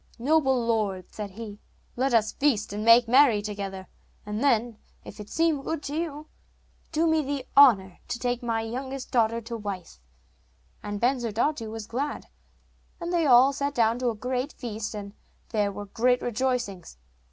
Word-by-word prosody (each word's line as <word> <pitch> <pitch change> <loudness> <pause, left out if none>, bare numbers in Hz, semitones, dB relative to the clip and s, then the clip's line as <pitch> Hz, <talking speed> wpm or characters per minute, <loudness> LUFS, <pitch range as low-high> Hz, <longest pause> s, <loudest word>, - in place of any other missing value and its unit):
'Noble 265 -2 +2
lord,' 205 -5 -1
said 210 -2 -5
he, 205 +1 -9 0.4
'let 265 +2 0
us 220 -2 +3
feast 240 -9 0
and 210 +1 -3
make 230 +1 +7
merry 250 -3 +5
together, 200 -2 -5 0.4
and 210 +4 -3
then, 235 -4 +1 0.3
if - - -11
it 210 0 -9
seem 325 -3 +1
good 310 +1 -4
to 290 - -4
you, 310 -2 -4 0.6
do 325 +1 +1
me 320 -1 +3
the 280 -2 -4
honour 205 -10 +6
to - - -3
take 245 +1 -2
my 230 -2 -1
youngest 260 +4 -5
daughter 230 -1 +2
to 230 +1 -6
wife.' 200 - -6 0.8
And 205 0 -5
Bensurdatu 240 +1 0
was 220 -1 -6
glad, 270 +7 -4 0.7
and 345 0 -4
they 335 -3 +2
all 260 +2 +6
sat 280 +1 -2
down 230 0 +2
to 250 -1 +1
a 230 - -3
great 250 +5 -3
feast, 220 -3 -5
and 200 -1 -7 0.4
there 210 -3 0
were 205 +1 -7
great 245 +5 +1
rejoicings. 240 - -2
235 Hz, 165 wpm, -26 LUFS, 210-270 Hz, 0.8 s, make